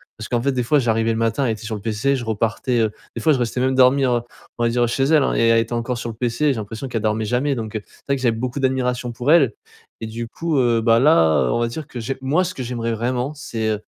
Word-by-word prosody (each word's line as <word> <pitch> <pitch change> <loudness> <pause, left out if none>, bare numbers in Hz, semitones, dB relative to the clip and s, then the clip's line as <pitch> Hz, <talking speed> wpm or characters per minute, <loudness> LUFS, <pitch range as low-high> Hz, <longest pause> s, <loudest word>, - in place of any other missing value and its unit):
Parce 110 - -8
qu'en 120 -1 0
fait 140 - +2
des 130 -2 -1
fois, 125 +5 +2
j'arrivais 115 -3 +1
le 110 - -1
matin, 115 +4 0
elle 115 - +1
était 110 - -9
sur 110 +1 -5
le 105 - -5
PC, 115 +6 0
je 125 - -4
repartais, 115 +2 -1
heu, 110 - +1 0.2
des 115 - -4
fois, 155 - +4
je 130 - 0
restais 120 +1 -1
même 130 +1 +1
dormir, 130 0 +4
heu, 120 - +1 0.4
on - - +1
va 120 - +3
dire 120 0 +1
chez 135 +3 0
elle, 150 -1 +4
hein - - 0
et 115 - +3
elle 115 0 +5
était 115 +1 -2
encore 120 +1 -2
sur 115 0 -5
le 110 - -7
PC. 125 +5 0
J'ai - - +3
l'impression 115 +5 -6
qu'elle 115 -3 -3
dormait 110 0 0
jamais. 130 +5 0
Donc, 110 -2 -5
heu, 110 - -2
c'est - - -23
vrai 140 - +2
que 130 - -8
j'avais 115 -3 +1
beaucoup 130 +3 -3
d'admiration 125 -2 0
pour 125 +5 0
elle 140 -10 +5 0.5
et 110 - -3
du 115 +1 -5
coup, 160 +1 -1
heu, 120 -2 +2
bah, 115 0 +4
là, 80 - +4
on - - +1
va 120 - +1
dire 140 +5 -6
que 125 - -7
j'ai 135 +4 -3
moi 150 +8 +2
ce 185 - -4
que - - -7
j'aimerais 115 -2 -3
vraiment, 125 +5 -2
c'est, 115 -6 -3
heu, 105 -1 -1
120 Hz, 295 wpm, -21 LUFS, 115-130 Hz, 0.5 s, elle